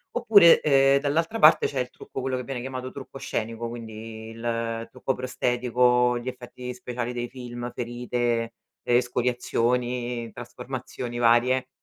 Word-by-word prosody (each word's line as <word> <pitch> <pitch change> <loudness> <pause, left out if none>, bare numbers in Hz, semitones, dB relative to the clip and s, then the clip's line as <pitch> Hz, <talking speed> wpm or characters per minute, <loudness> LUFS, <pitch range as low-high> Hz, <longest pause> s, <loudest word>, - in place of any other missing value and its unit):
Oppure, 210 -8 +7
ehm, 135 -1 +5
dall'altra 165 +9 0
parte 155 - +7
c'è 135 - -3
il 125 0 -2
trucco 135 - -8
quello 130 0 -1
che 125 - -4
viene 130 -1 -5
chiamato 130 0 -5
trucco 135 0 -9
scenico, 115 -1 -3
quindi 110 -1 -8
il 115 0 -3
trucco 135 - -2
prostetico, 125 -1 +2
gli 120 - -9
effetti 125 0 -7
speciali 125 -1 -4
dei 120 0 -3
film, 120 -1 -7
ferite, 120 -1 -2 0.3
escoriazioni, 120 -1 0
trasformazioni 120 0 -7
varie. 120 +2 +3
125 Hz, 130 wpm, -25 LUFS, 120-130 Hz, 0.3 s, Oppure